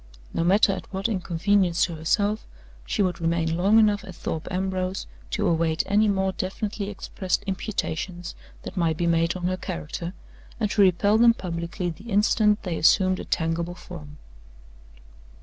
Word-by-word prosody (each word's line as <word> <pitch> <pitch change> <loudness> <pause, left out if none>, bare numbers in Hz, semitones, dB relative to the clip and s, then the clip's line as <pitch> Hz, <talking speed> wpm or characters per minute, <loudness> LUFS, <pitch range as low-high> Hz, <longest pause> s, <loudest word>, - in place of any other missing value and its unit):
No 165 - 0
matter 195 +3 +4
at - - -7
what 195 +1 -1
inconvenience 185 -2 +1
to 175 - -6
herself, 200 +7 0 0.4
she - - +1
would 180 -2 -1
remain 165 0 +1
long 195 +6 +4
enough 210 -2 +4
at 185 -4 -10
Thorpe 160 -1 -4
Ambrose 185 0 -2 0.2
to - - -1
await 165 -1 +1
any 210 +2 +3
more 190 -1 +1
definitely 200 +2 -3
expressed 190 -2 -3
imputations 185 -3 -3 0.3
that - - -7
might 165 -4 +1
be 175 - 0
made 170 0 +2
on 180 - -6
her 185 +1 0
character, 170 - -5 0.4
and 210 -3 0
to 210 - +3
repel 200 +3 +4
them 235 0 +6
publicly 170 -1 -3
the 200 +8 -11
instant 210 0 +3
they 175 -4 -2
assumed 185 +2 +4
a - - -6
tangible 165 +1 -1
form. 150 -5 -10
185 Hz, 160 wpm, -25 LUFS, 170-200 Hz, 0.4 s, them